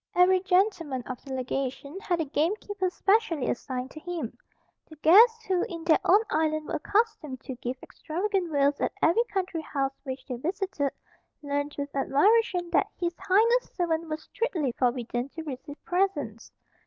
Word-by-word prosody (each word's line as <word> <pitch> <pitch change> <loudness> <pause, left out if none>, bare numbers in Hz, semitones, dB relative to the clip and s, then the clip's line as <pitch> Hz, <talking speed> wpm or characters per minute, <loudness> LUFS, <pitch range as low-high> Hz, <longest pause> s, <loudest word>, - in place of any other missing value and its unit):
Every 370 +1 +5
gentleman 360 - +1
of 255 0 -7
the 275 - -9
legation 270 +5 -3
had 355 -4 -1
a 325 - 0
gamekeeper 370 +6 -1
specially 390 - +1
assigned 255 +1 -4
to 310 - -9
him. 325 -7 -5 0.5
The 315 - -12
guests, 445 +9 +6
who, 370 -3 +1
in 335 -2 -6
their 325 -2 +4
own 405 +4 +5
island 310 0 +1
were - - -4
accustomed 405 - 0
to 260 - -6
give 250 +1 -4
extravagant 365 +1 -2
vails 285 -1 +2
at - - 0
every 450 +9 +4
country 370 -6 -2
house 275 -3 -2
which 260 -1 -6
they 250 - -4
visited, 325 - -2 0.5
learned, 285 +1 -2
with 285 0 -5
admiration, 350 +5 +2
that - - +3
His 345 -1 -1
Highness's 460 +6 +3
servants 335 -2 0
were 310 - -2
strictly 315 - -2
forbidden 245 +1 -1
to 325 - -5
receive 290 0 -7
presents. 325 - -1
320 Hz, 160 wpm, -27 LUFS, 275-380 Hz, 0.5 s, guests